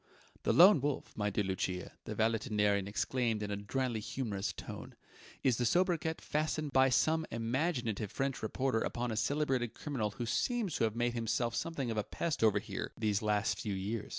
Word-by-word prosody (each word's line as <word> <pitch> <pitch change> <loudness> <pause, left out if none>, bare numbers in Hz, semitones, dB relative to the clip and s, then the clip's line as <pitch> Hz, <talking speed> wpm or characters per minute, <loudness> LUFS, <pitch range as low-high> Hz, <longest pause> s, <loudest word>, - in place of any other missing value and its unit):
"The - - +1
Lone 180 -3 +8
Wolf, 145 0 -2
my 105 -1 0
dear 105 +1 0
Lucia," 95 -1 -2
the - - -4
valetudinarian 105 -3 +1
explained 115 +1 0
in 105 - -3
a - - 0
dryly 115 +3 -2
humourous 105 -3 -3
tone, - - -8 0.5
"is 125 -4 +3
the 125 - 0
sobriquet 170 +2 +2
fastened 155 -1 -1
by 130 0 +5
some 160 +6 +3
imaginative 115 - -1
French 135 -1 -2
reporter 130 +2 0
upon 120 +1 -2
a - - -2
celebrated 130 0 0
criminal 130 -8 -2
who 120 +4 -5
seems 220 - 0
to - - +3
have 110 0 -2
made 120 0 +1
himself 115 0 0
something 140 -7 -2
of 110 - -3
a 105 - +1
pest 160 +4 -2
over 105 -2 +5
here, 100 -2 -4
these 105 -1 +1
last 105 0 +1
few 105 -3 -2
years. 105 +3 -3
115 Hz, 180 wpm, -33 LUFS, 105-135 Hz, 0.5 s, Lone